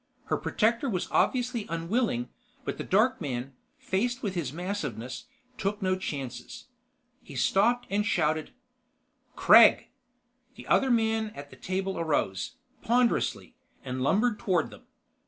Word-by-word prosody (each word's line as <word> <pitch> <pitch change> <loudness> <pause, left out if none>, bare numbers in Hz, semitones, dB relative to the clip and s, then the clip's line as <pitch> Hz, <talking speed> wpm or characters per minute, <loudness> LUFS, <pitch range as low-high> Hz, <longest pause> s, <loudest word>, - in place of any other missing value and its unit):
Her - - 0
protector 230 +5 0
was 185 -5 -2
obviously 245 -3 +1
unwilling, 165 - -1 0.4
but - - -4
the - - -2
dark 220 +6 +2
man, 135 -2 -4 0.2
faced 240 +6 -1
with 200 -4 -1
his 165 -8 -3
massiveness, 170 - -5 0.3
took 205 0 -1
no 185 -2 +1
chances. 155 - -6 0.6
He 140 - -12
stopped 235 - +2
and 205 +1 0
shouted: 155 -6 0 0.9
"Kregg!" - - +7 0.7
The - - -11
other 270 - +3
man 225 -2 +2
at 145 0 -9
the - - -12
table 190 +7 -3
arose, 145 - -1 0.3
ponderously, 240 +1 +1 0.3
and 130 0 -4
lumbered 210 - +2
toward 180 -5 0
them. - - -15
190 Hz, 130 wpm, -28 LUFS, 150-230 Hz, 0.9 s, Kregg